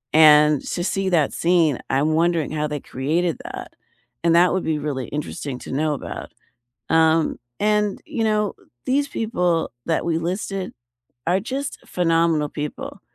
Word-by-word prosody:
And 150 Hz, -2 st, +7 dB
to 175 Hz, -, -3 dB
see 195 Hz, 0 st, 0 dB
that 160 Hz, -5 st, +2 dB
scene, 165 Hz, -5 st, +2 dB
I'm 145 Hz, +4 st, +2 dB
wondering 165 Hz, -1 st, +1 dB
how 150 Hz, -1 st, -1 dB
they 150 Hz, 0 st, -3 dB
created 160 Hz, +7 st, -1 dB
that, -, -, -7 dB, 0.5 s
and 170 Hz, 0 st, +4 dB
that 180 Hz, +2 st, +5 dB
would 190 Hz, -, 0 dB
be 160 Hz, -1 st, 0 dB
really 140 Hz, -3 st, -3 dB
interesting 145 Hz, -2 st, -4 dB
to -, -, -9 dB
know 150 Hz, +2 st, +1 dB
about. -, -, -7 dB, 0.6 s
Um, 160 Hz, 0 st, +3 dB, 0.2 s
and, 210 Hz, -1 st, +1 dB
you 285 Hz, -8 st, -2 dB
know, 210 Hz, -2 st, +1 dB, 0.3 s
these 280 Hz, +2 st, +1 dB
people 180 Hz, -, 0 dB, 0.2 s
that 165 Hz, 0 st, 0 dB
we 165 Hz, -1 st, +1 dB
listed 185 Hz, +2 st, -3 dB, 0.6 s
are 180 Hz, +3 st, +2 dB
just 270 Hz, +6 st, -4 dB
phenomenal 165 Hz, -3 st, +2 dB
people. 150 Hz, 0 st, -6 dB
165 Hz, 150 wpm, -22 LUFS, 150-190 Hz, 0.6 s, And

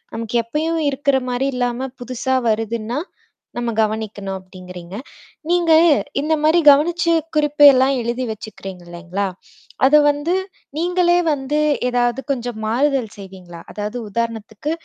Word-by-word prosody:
நமக்கு 230 Hz, +1 st, -2 dB
எப்பயும் 315 Hz, +7 st, -2 dB
இருக்கிற 280 Hz, 0 st, +1 dB
மாரி 255 Hz, +2 st, 0 dB
இல்லாம 245 Hz, +1 st, -2 dB
புதுசா 255 Hz, +1 st, -1 dB
வருதுன்னா, 225 Hz, +3 st, -2 dB, 0.6 s
நம்ம 240 Hz, -1 st, -1 dB
கவனிக்கணும் 210 Hz, -3 st, -3 dB
அப்டிங்கறீங்க. 180 Hz, -1 st, -11 dB, 0.5 s
நீங்க 345 Hz, -2 st, +2 dB, 0.5 s
இந்த 310 Hz, +2 st, 0 dB
மாரி 315 Hz, +3 st, +4 dB
கவனிச்சு 335 Hz, +4 st, +3 dB, 0.2 s
குறிப்பெல்லாம் 290 Hz, -3 st, +5 dB
எழுதி 235 Hz, +2 st, -2 dB
வச்சுக்கறீங்க 195 Hz, -4 st, -8 dB
இல்லைங்களா? 175 Hz, +3 st, -4 dB, 0.6 s
அத 275 Hz, -, +5 dB
வந்து 290 Hz, +4 st, 0 dB, 0.4 s
நீங்களே 350 Hz, +1 st, +2 dB
வந்து 290 Hz, 0 st, -1 dB, 0.3 s
ஏதாவது 245 Hz, 0 st, 0 dB
கொஞ்சம் 245 Hz, -3 st, -3 dB
மாறுதல் 255 Hz, +1 st, +1 dB
செய்வீங்களா? 185 Hz, -3 st, -11 dB
அதாவது 210 Hz, +3 st, -5 dB
உதாரணத்துக்கு, 230 Hz, +4 st, -4 dB
245 Hz, 115 wpm, -19 LUFS, 215-290 Hz, 0.6 s, குறிப்பெல்லாம்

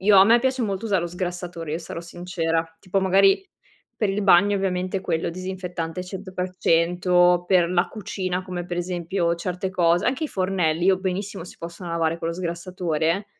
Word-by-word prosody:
io 200 Hz, +1 st, +5 dB
a 190 Hz, -, +9 dB
me 230 Hz, +3 st, +6 dB
piace 260 Hz, 0 st, 0 dB
molto 200 Hz, 0 st, -2 dB
usare 195 Hz, -4 st, +2 dB
lo -, -, -1 dB
sgrassatore, 175 Hz, -2 st, -5 dB
io 160 Hz, -, -1 dB
sarò 165 Hz, -, -7 dB
sincera. 170 Hz, -1 st, -2 dB, 0.2 s
Tipo 195 Hz, 0 st, 0 dB
magari 195 Hz, -, +4 dB, 0.5 s
per 210 Hz, -, 0 dB
il 205 Hz, +2 st, -1 dB
bagno 200 Hz, +1 st, +5 dB
ovviamente 185 Hz, 0 st, -1 dB
quello 165 Hz, -3 st, -1 dB
disinfettante 180 Hz, -1 st, -5 dB
100%, 180 Hz, -1 st, +1 dB
per 175 Hz, -2 st, +4 dB
la 180 Hz, 0 st, +2 dB
cucina 185 Hz, -4 st, -3 dB
come 180 Hz, -1 st, -5 dB
per 175 Hz, 0 st, -5 dB
esempio 175 Hz, 0 st, -1 dB
certe 180 Hz, +2 st, -3 dB
cose, 175 Hz, -1 st, +2 dB
anche 270 Hz, +5 st, 0 dB
i -, -, -3 dB
fornelli 180 Hz, -3 st, 0 dB
io 190 Hz, -1 st, +4 dB
benissimo 190 Hz, 0 st, -3 dB
si -, -, -12 dB
possono 170 Hz, +1 st, -7 dB
lavare 165 Hz, 0 st, 0 dB
con 165 Hz, -, -3 dB
lo 165 Hz, -, -2 dB
sgrassatore. 170 Hz, +1 st, -2 dB
180 Hz, 175 wpm, -24 LUFS, 170-190 Hz, 0.5 s, a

